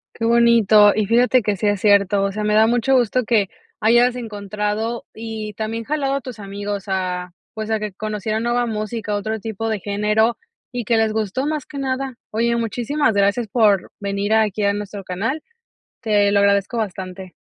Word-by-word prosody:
Qué 225 - -3
bonito. 230 -3 +5
Y 215 - 0
fíjate 245 +4 +3
que 210 -1 0
sí 205 +2 -1
es 205 -1 +1
cierto, 200 -1 +3
o 200 - 0
sea, 210 +1 -3
me 210 0 +1
da 220 +1 +5
mucho 245 +3 +2
gusto 250 0 +2
que 215 -4 +2 0.3
hayas 240 +3 +4
encontrado, 210 0 -3
y 220 -1 -6
también 225 +2 -4
jalado 280 -2 -1
a 275 - -2
tus 250 -3 -8
amigos 200 0 -5
a, 180 -1 -2 0.2
pues, 220 0 -5
a 220 - +1
que 210 -2 -5
conocieran 215 +2 -3
nueva 240 +1 +1
música, 215 -1 -3
otro 220 +2 -3
tipo 225 +1 -4
de 215 -2 -1
género, 210 +3 +1 0.4
y 245 - -2
que 230 +1 +1
les 220 -1 +2
gustó 220 +4 -1
más 305 -3 -2
que 300 - -10
nada. 265 -1 -2
Oye, 235 +2 0
muchísimas 235 +3 0
gracias 200 +3 +1
por 205 -4 +2
venir 200 +1 -1
aquí 215 -2 +2
a 200 0 +3
nuestro 205 -1 -6
canal. 215 - -3 0.6
Te 205 -2 +2
lo 200 - +3
agradezco 200 +3 +2
bastante. 190 -3 -5
215 Hz, 185 wpm, -20 LUFS, 205-235 Hz, 0.6 s, bonito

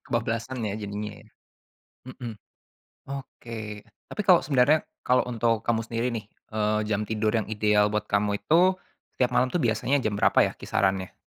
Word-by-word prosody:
Kebablasan 115 +1 -2
ya, 100 -1 -2
jadinya, 105 0 -4
ya. - - -21 0.9
Heeh. 120 -4 -7 0.7
Oke, 130 -4 -7 0.5
tapi 210 - -3
kalau 180 -2 +7
sebenarnya 140 +2 +3 0.2
kalau 125 0 +4
untuk 115 -2 +1
kamu 115 0 0
sendiri 115 +1 -1
nih, 115 -3 -4 0.3
eee, 105 0 +1
jam 105 0 0
tidur 110 0 0
yang 110 - -1
ideal 105 -1 +2
buat 105 0 -2
kamu 100 0 +1
itu, 175 - +4 0.4
setiap 125 -1 +1
malam 130 +1 +3
tuh 175 - +1
biasanya 120 +4 +1
jam 105 -3 -1
berapa - - +4
ya, - - +2
kisarannya? 95 -1 -1
115 Hz, 160 wpm, -26 LUFS, 105-125 Hz, 0.9 s, kalau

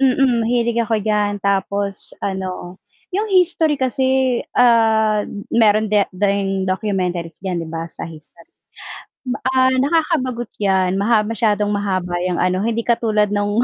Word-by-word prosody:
Mm, 260 -2 +3
mahilig 235 0 +1
ako 230 0 0
diyan 205 -2 0
tapos 200 0 -2
ano 185 -1 -5 0.3
yung 420 +4 0
history 345 -5 +2
kasi, 260 -1 +1 0.2
ah, 220 -3 +3 0.3
meron 215 -2 +3
di 210 - +5 0.2
ding 195 0 0
documentaries 185 -4 -2
diyan 180 -2 -2
'di 165 - -6
ba 165 0 -4
sa - - -7
history. 160 +1 -15 0.8
Ba 255 +1 -3 0.2
ah, 260 0 +4
nakakabagot 265 -5 0
yan 190 -1 +1
maha 215 +1 +3
masyadong 210 -1 0
mahaba 185 -4 -1
yang 180 - -1
ano, 185 +1 +1
hindi 230 +2 -1
katulad 215 -3 +1
nung 205 +3 +1
210 Hz, 135 wpm, -19 LUFS, 190-240 Hz, 0.8 s, di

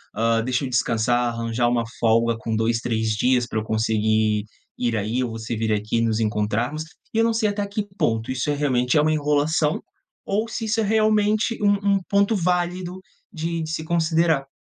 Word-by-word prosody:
"Hã, 115 +1 +2
deixa 125 +1 -1
eu - - -4
descansar, 120 -1 +1
arranjar 115 +1 -1
uma 120 -1 +1 0.2
folga 115 0 +3
com 110 0 -3
2, 115 +1 +1
3 110 -2 -1
dias 125 +3 +2
pra 110 - -2
eu - - -4
conseguir 110 -1 +1 0.3
ir 120 -2 0
aí, 110 +4 -1
ou 120 - -3
você 115 +1 -4
vir 110 0 0
aqui 105 +2 -1
e - - +2
nos 115 -1 +1
encontrarmos", 110 +7 -1 0.3
e - - -2
eu 225 - +4
não 230 0 +2
sei 220 -1 +1
até 205 0 -2
que 200 +1 -2
ponto 115 - 0
isso 130 +2 -2
é - - +2
realmente 130 -3 +1
é - - +5
uma 155 +1 +2
enrolação, 150 +1 +1 0.4
ou 215 +3 0
se 225 0 -4
isso 220 +1 0
é - - +2
realmente 215 +1 +2
um 200 -1 +3
um - - +1
ponto 200 +2 +2
válido 180 0 -1 0.3
de 165 +1 -3
de 160 - -4
se 160 0 -3
considerar. 160 -3 +1
130 Hz, 200 wpm, -23 LUFS, 115-180 Hz, 0.4 s, é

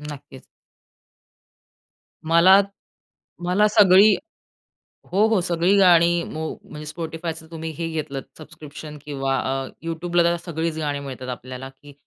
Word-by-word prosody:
नक्कीच. 145 -2 -10 1.8
मला 170 +4 +6 0.8
मला 185 +4 +3
सगळी 205 0 +6 1.0
हो, 200 +4 +3
हो 220 -4 +2
सगळी 175 +2 +1
गाणी 175 -2 +5
मो 160 0 -5 0.2
म्हणजे 150 0 -10
Spotifyच 165 0 -5
तुम्ही 160 0 -5
हे 165 -1 -3
घेतलंत, 150 -4 -4
सबस्क्रिप्शन 155 -1 -11
किंवा 135 -2 -2
अ, 135 0 -2 0.2
YouTubeला 170 +1 0
तर 170 0 +2
सगळीच 165 -1 -3
गाणी 145 -2 -2
मिळतात 130 -2 -7
आपल्याला, 130 +1 -7
की 140 +2 -17
160 Hz, 120 wpm, -22 LUFS, 145-175 Hz, 1.8 s, मला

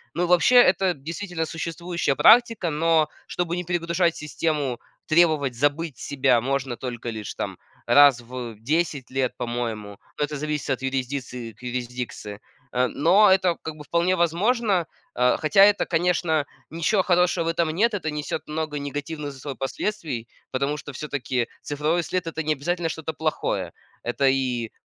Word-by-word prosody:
Ну, 175 - +1
вообще, 180 +8 +4
это 190 -5 +5
действительно 165 +4 -4
существующая 170 -1 -2
практика. 230 - +5
Но, 160 0 +2 0.2
чтобы 175 -1 -2
не 180 - -3
перегружать 170 0 0
систему, 150 -4 -2 0.3
требовать 155 -6 +3
"забыть 145 +2 0
себя", 130 -4 +2
можно 130 -1 -2
только 120 -2 -5
лишь, 110 -3 -5
там, - - -4 0.3
раз 140 -3 +7
в 120 -1 -7
10 145 +1 -1
лет, 130 -2 -1
по-моему. 115 -4 -4 0.2
Но - - 0
это 150 +1 -6
зависит 150 0 -3
от 130 - -1
юрисдикции 130 -3 -3
к 105 - -24
юрисдикции. 120 -4 -5 0.3
Э, 125 +1 +2
но 185 +11 +4
это 185 -2 +3
как 160 -1 -6
бы 150 - -10
вполне 170 +4 +1
возможно, 185 +2 +1 0.3
а, 125 0 +3
хотя 160 +6 +5
это, 205 0 +3
конечно 165 -3 +1 0.2
ничё 170 +5 +1
хорошего 180 -1 +2
в - - -2
этом 165 -1 +1
нет. 215 +8 +2
Это 170 -6 -2
несет 150 +1 -4
много 155 -1 -3
негативных 145 +1 -5
за 135 - -13
собой 140 -3 -6
последствий, 135 - -3 0.2
потому 140 +3 -1
что, 145 0 -9
всё-таки, 130 -4 -2
цифровой 150 +4 0
след- 180 0 -2
это 160 0 -3
не 155 0 +1
обязательно 170 +4 -2
что-то 160 0 -4
плохое. 155 0 -2 0.3
Это 120 +3 +1
и, 125 -4 -1
150 Hz, 155 wpm, -24 LUFS, 130-170 Hz, 0.3 s, раз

